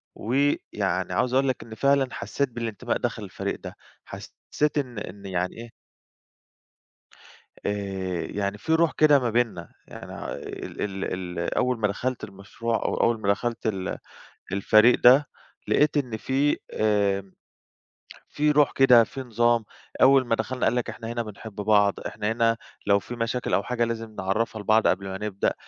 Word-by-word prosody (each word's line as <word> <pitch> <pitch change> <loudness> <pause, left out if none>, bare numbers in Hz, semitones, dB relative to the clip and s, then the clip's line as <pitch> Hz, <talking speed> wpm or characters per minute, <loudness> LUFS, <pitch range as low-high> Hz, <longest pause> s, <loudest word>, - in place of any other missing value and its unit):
ويعني 140 +6 -1
عاوز 125 0 0
أقول 135 +1 +3
لك 130 - -1
إن 110 -1 -10
فعلًا 140 +1 +3
حسّيت 140 -2 -2
بالانتماء 115 -4 -3
داخل - - -3
الفريق - - -4
ده. - - -9 0.3
حسّيت 150 0 -3
إن 125 -6 -2
إن 100 0 -9
يعني 90 -1 -2
إيه 115 0 -9 1.9
آآ 95 -3 -2
يعني 100 0 -2
في 160 +10 -1
رُوح 165 0 +3
كده 150 -2 +6
ما 125 -2 -1
بيننا. 115 -8 -1 0.2
يعني، - - -10
ع - - -6
ال 95 -1 -5 0.3
ال 85 - -2
أول 125 -2 +1
ما 105 - +2
دخلت 125 +5 -3
المشروع 100 +4 -4
أو - - -1
أول 115 -1 +2
ما 100 - -1
دخلت 115 +3 -1
ال 95 -4 -2 0.5
الفريق 110 +4 +5
ده، 130 +4 +7 0.4
لقيت 150 0 +3
إن 125 -6 -1
فيه 135 +7 +1 0.2
آمم 100 -3 +1 1.0
في 150 0 +1
رُوح 150 -1 +4
كده، 125 -3 +6
في 135 +4 -7
نظام. 120 -1 +2 0.4
أول 135 0 +6
ما 115 - +2
دخلنا 125 +3 -2
قال - - +2
لك: 125 - -1
"إحنا 115 - -7
هنا 120 0 -2
بنحب 105 0 -10
بعض، 105 -1 +3
إحنا 105 +1 -3
هنا 115 0 +2 0.3
لو 100 0 +5
في 120 - -8
مشاكل 115 +1 -2
أو 100 - +2
حاجة 120 +2 -1
لازم 115 -1 -5
نعرّفها 105 +3 -1
لبعض 110 +2 +3
قبل 95 +1 +1
ما 95 0 -4
نبدأ، 100 -1 -1
115 Hz, 160 wpm, -25 LUFS, 100-125 Hz, 1.9 s, ده